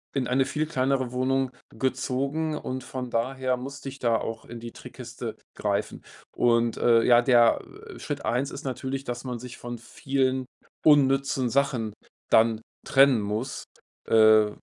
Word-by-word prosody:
in 130 -3 0
eine 130 +1 +2
viel 155 +3 -1
kleinere 130 -4 0
Wohnung 130 +1 0 0.2
gezogen 135 +4 -2
und 130 -3 -5
von 130 -1 -5
daher 130 +2 -1
musste 135 +2 -7
ich 135 +1 -11
da 115 -2 +2
auch 110 0 -5
in 120 0 -9
die 115 - -7
Trickkiste - - -8 0.2
greifen. - - -2 0.3
Und, 115 -1 +2
äh, 115 -1 +4
ja, 120 -1 +6
der, 120 -2 +4 0.4
äh, - - -11
Schritt - - -5
1 130 +4 0
ist - - -8
natürlich, 130 +1 -4
dass 120 -2 -5
man 125 -1 -4
sich 125 0 -9
von 120 0 -6
vielen 130 +2 -1 0.4
unnützen 135 -3 +4
Sachen 125 -5 0 0.4
dann 110 0 +4 0.3
trennen 135 -4 +5
muss, 105 +6 -4 0.4
äh, 110 -1 +6
130 Hz, 150 wpm, -26 LUFS, 120-135 Hz, 0.4 s, ja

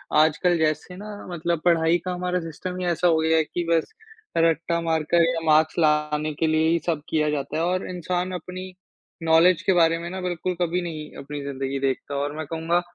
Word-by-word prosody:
आजकल 160 +3 +3
जैसे 155 +3 -1
ना 210 +3 -8 0.2
मतलब 170 -1 -1
पढ़ाई 165 0 +4
का 180 - -1
हमारा 180 0 -1
सिस्टम 165 +3 -6
ही 180 - -2
ऐसा 175 +1 +2
हो 165 -2 +4
गया 160 0 +3
है 160 - +4
कि 175 +3 -4
बस 165 -1 +1 0.5
रट्टा 165 +1 +2
मारकर 165 +1 +2
या 165 -1 -1
मार्क्स 155 0 +4
लाने 150 -1 +1
के 160 +2 0
लिए 160 0 +2
ही 170 +1 +2
सब 160 -4 0
किया 155 -1 +1
जाता 145 0 -2
है 165 - 0
और 180 +2 -1
इंसान 180 +1 -2
अपनी 185 +2 -6 0.5
नॉलेज 165 +2 +5
के 190 - +2
बारे 165 -1 +4
में 170 +1 -5
ना 190 +1 -5
बिल्कुल 180 0 -2
कभी 175 +1 +1
नहीं 155 -3 -6
अपनी 145 +1 -6
ज़िंदगी 135 0 -3
देखता 135 +1 -2
और 145 +1 -2
मैं 155 - -4
कहूँगा 165 +2 +1
165 Hz, 205 wpm, -24 LUFS, 155-175 Hz, 0.5 s, नॉलेज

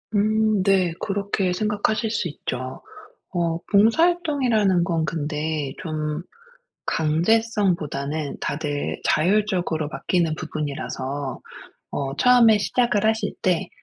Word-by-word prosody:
음. 215 -1 +2
네. 190 -3 +3
그렇게 200 -2 -1
생각하실 215 +3 0
수 210 -5 -1
있죠. 130 -4 -5 0.5
어 170 -1 0
봉사 220 +10 +5
활동이라는 255 - +2
건 165 -3 0
근데 150 -2 -2
좀 155 -1 -3 0.7
강제성보다는 160 -4 0
다들 145 -1 -2
자율적으로 180 -3 +1
맡기는 165 0 0
부분이라서 140 -3 -4 0.5
어 135 0 -3
처음에 240 -2 +6
시작을 215 -1 +1
하실 220 -2 0
때 180 -3 +1
180 Hz, 240 characters per minute, -23 LUFS, 155-215 Hz, 0.7 s, 처음에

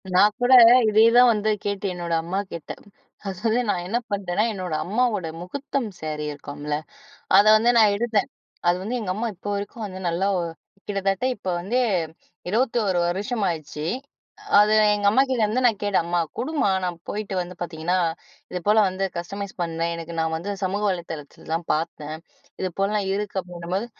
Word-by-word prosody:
நா - - +6 0.2
கூட 245 +1 +4 0.4
இதே 215 +1 +4
தான் 245 0 +8
வந்து 215 -1 0
கேட்டு 200 0 -3
என்னோட 175 -1 -4
அம்மாகிட்ட, 180 -1 -4 0.6
ஆக்சொலி 220 +5 0
நான் 175 -3 0
என்ன 230 +5 +1
பண்ணிட்டேன்னா, 200 0 0
என்னோட 185 -5 -4
அம்மாவோட 215 -2 0
முஹூர்த்தம் 270 +7 -3
ஸேரி 155 -1 -4
இருக்கும்ல? 145 +1 -5 0.6
அத 200 - +7
வந்து 230 +2 +3
நான் 215 -3 +6
எடுத்தேன். 220 0 +1 0.4
அது 175 - +4
வந்து 225 +6 -2
எங்க 205 -5 -3
அம்மா 220 +4 -2
இப்போ 190 +3 -6
வரைக்கும் 205 +3 -5
வந்து, 185 -1 -8
நல்லா 170 +3 0
ஒ - - 0 0.5
கிட்டத்தட்ட 195 +2 -1
இப்போ 190 - -4
வந்து 225 +8 0 0.7
21 220 -3 +1
வருஷம் 205 +5 -1
ஆச்சி. 155 -2 -5 0.7
அது 210 +1 +4 0.2
எங்க 205 -1 -1
அம்மாகிட்டேருந்து 255 -1 +2
நான் 225 -4 +2
கேட்டேன், 200 -4 +1
"அம்மா 175 0 +1 0.2
குடும்மா. 290 -6 0
நான் 175 -1 -2
போய்ட்டு 205 -2 -4
வந்து 180 0 -6
பார்த்தீங்கன்னா, 175 +1 -1 0.5
இதுபோல 195 +4 +2
வந்து 185 +1 -2
கஸ்டமைஸ் 200 +3 -6
பண்வேன். 165 0 -2
எனக்கு 165 0 -7
நா - - +2
வந்து 185 +5 -4
சமூக 195 +3 -1
வலைதளத்தில 165 -5 -7
தான் 165 0 -3
பாத்தேன். 155 -1 -3 0.5
இதுபோலலாம் 195 +2 -1
இருக்கு" 205 -1 -3
அப்படின்னும்போது, 180 +4 -4
195 Hz, 155 wpm, -24 LUFS, 175-215 Hz, 0.7 s, தான்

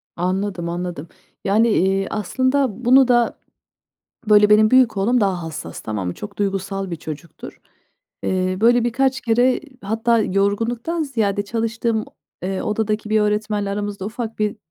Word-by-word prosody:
Anladım, 185 0 -2
anladım. 175 -2 -5 0.4
Yani, 215 +4 +3
eee, 195 -1 +1
aslında 255 +2 0
bunu 260 +1 +6
da, 240 -2 +2 0.9
böyle, 210 0 +6
benim 215 +1 +6
büyük 255 -4 +4
oğlum 235 +6 +2
daha 190 -4 0
hassas, 160 -1 -7
tamam 105 -4 -4
mı? 90 - -4
Çok 205 -1 -9
duygusal 195 -1 -2
bir 170 - -3
çocuktur. 155 +1 -9 0.6
Eee, 185 0 0
böyle, 240 +1 +4
birkaç 265 +3 +1
kere, 245 +2 +3
eee, - - -16 0.2
hatta 225 +3 +1
yorgunluktan 225 - 0
ziyade 220 -8 -1
çalıştığım 225 +1 -1
o, - - -20 0.3
eee, 190 +1 -2
odadaki 215 0 -2
bir 215 0 +3
öğretmenle 210 -1 0
aramızda 205 -1 -4
ufak 225 0 -5
bir, 210 -1 -1
210 Hz, 145 wpm, -21 LUFS, 195-235 Hz, 0.9 s, bunu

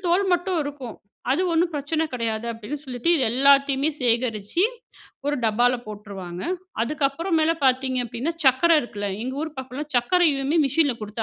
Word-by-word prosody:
தோல் 360 +4 +3
மட்டும் 355 0 +1
இருக்கும். 280 -5 -7 0.3
அது 305 +8 +2
ஒண்ணும் 335 +1 +2
பிரச்சனை 300 +3 -1
கிடையாது, 230 -2 -2
அப்படின்னு 225 +6 -6
சொல்லிட்டு, 250 +2 -3
இது 270 - +2
எல்லாத்தையுமே 275 +2 +4
சேகரிச்சு 235 - +1 0.6
ஒரு 290 0 +1
டப்பால 240 +3 +2
போட்டுருவாங்க. 195 -4 -8 0.4
அதுக்கப்புறம் 305 +5 0
மேலே 325 +1 +2
பார்த்தீங்க 260 0 +2
அப்படின்னா, 240 +8 -3
சர்க்கரை 315 +6 +5
இருக்குல்ல, 205 -4 -5
எங்க 260 +1 -4
ஊர் 315 -1 -5
பக்கத்தில 265 +3 -6
சர்க்கரையுமே 290 +2 +2
மெஷினில 280 0 +2
கொடுத்து 215 +1 -4
265 Hz, 145 wpm, -23 LUFS, 235-310 Hz, 0.6 s, சர்க்கரை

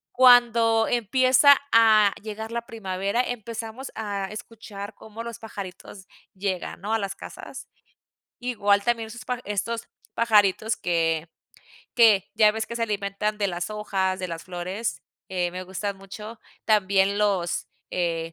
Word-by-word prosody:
cuando 235 -3 +6
empieza 255 +4 +5
a 215 -3 +6
llegar 220 +1 -6
la 235 0 -4
primavera, 200 +1 -1
empezamos 230 +2 -6
a 200 -3 -3
escuchar 210 -1 -8
cómo 220 +1 -9
los 235 -2 -7
pajaritos 195 -2 -9 0.3
llegan, 190 -2 -3
¿no?, 215 +3 -2
a 225 - +2
las 195 -2 -3
casas. - - -10 0.7
Igual 205 -5 +1
también 230 -1 0
sus 240 +2 -10
paja 250 -1 -3
estos 225 +3 -3 0.3
pajaritos 220 -1 +3
que 165 -2 0 0.7
que 220 -5 +5
ya 215 -1 +6
ves 220 0 -3
que 235 - -6
se 230 - +1
alimentan 210 0 -2
de 200 -2 +1
las 175 +1 -3
hojas, 195 -3 -1
de 185 - -4
las 165 -1 -6
flores, 185 +5 -4 0.3
eh, 180 -2 -1
me 185 +1 -6
gustan 190 +2 -4
mucho 210 +3 -10 0.2
también 200 -1 +3
los, 195 -5 0 0.2
eh, 165 -2 -2
210 Hz, 140 wpm, -25 LUFS, 190-230 Hz, 0.7 s, cuando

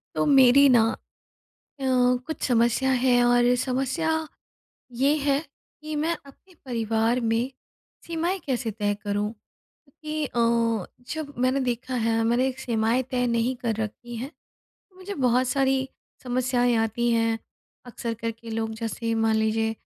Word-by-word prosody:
तो - - +1
मेरी 275 0 +7
ना 240 -3 +6 1.0
अ, - - -6 0.4
कुछ 315 - -5
समस्या 240 +2 +2
है 245 -2 +4
और 245 0 +4
समस्या 265 +5 -1 0.9
ये 285 +2 +4
है 280 -2 +1 0.4
कि 310 0 -5
मैं 325 +3 0
अपने 360 +7 -18
परिवार 230 -1 0
में 230 +2 0 0.6
सीमाएँ 340 +3 -1
कैसे 245 -4 -1
तय 205 -1 -1
करूँ? 205 0 -1
क्योंकि 305 +7 -9
अ, 230 -4 +1 0.3
जब 310 -2 -5
मैंने 255 +2 +2
देखा 245 +2 -3
है 225 -1 +1
मैंने 245 +3 +2
सीमाएँ 235 0 +1
तय 250 -1 +1
नहीं 235 +2 +1
कर 235 -2 -2
रखी 235 +3 -7
हैं 245 +4 -4
तो - - -45 0.4
मुझे 375 +2 -6
बहुत 255 -4 +2
सारी 265 0 +1 0.4
समस्याएँ 245 -1 +1
आती 225 +2 0
हैं। 225 -1 +1 0.5
अक्सर 235 -1 -4
करके 230 0 -6
लोग 225 0 -2
जैसे 230 0 -2
मान 220 0 +3
लीजिए 220 0 +1
245 Hz, 140 wpm, -25 LUFS, 230-265 Hz, 1.0 s, मेरी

